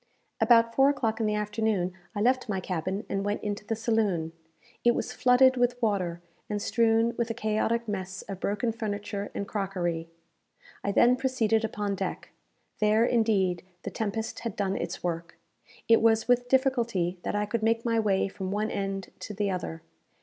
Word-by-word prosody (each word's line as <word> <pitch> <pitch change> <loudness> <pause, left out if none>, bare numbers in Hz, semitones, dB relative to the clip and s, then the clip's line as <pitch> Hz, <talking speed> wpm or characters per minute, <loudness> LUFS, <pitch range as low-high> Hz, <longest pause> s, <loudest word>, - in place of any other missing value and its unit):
About 230 -1 +5
four 270 +3 +5
o'clock 235 -6 0
in 220 - +1
the 210 - +1
afternoon, 210 -3 0 0.2
I 205 - -1
left 255 +1 +2
my 195 -2 0
cabin 185 +3 -3
and 195 0 -2
went 205 +1 -2
into 205 0 -3
the 225 +2 -2
saloon. 215 -8 0 0.5
It 240 0 +4
was - - -3
flooded 260 +1 +5
with 245 0 +1
water, 185 -7 -1 0.3
and 210 -1 -1
strewn 225 +2 +2
with 235 0 0
a 230 - -2
chaotic 225 +1 0
mass 190 -2 -4
of 195 -2 -7
broken 210 +5 0
furniture 205 -2 -4
and 200 - -3
crockery. 175 -5 -2 0.7
I 200 - 0
then 245 +5 +5
proceeded 235 -4 +1
upon 210 -2 -2
deck. 195 -1 -4 0.5
There, 215 +2 +4
indeed, 205 -7 +2 0.2
the - - -4
tempest 220 +1 -3
had 230 -4 -4
done 195 -1 -1
its 175 -1 -4
work. 170 -1 -3 0.5
It 230 - +6
was 225 -1 +3
with 245 0 +3
difficulty 235 -10 +1
that - - -3
I 205 0 +1
could 220 +2 -2
make 230 +1 +1
my 230 -1 +2
way 200 -3 +2
from 190 -1 -5
one 210 +2 -1
end 195 -1 -3
to 210 - -7
the 200 0 0
other. 165 -3 -4
210 Hz, 180 wpm, -28 LUFS, 195-230 Hz, 0.7 s, It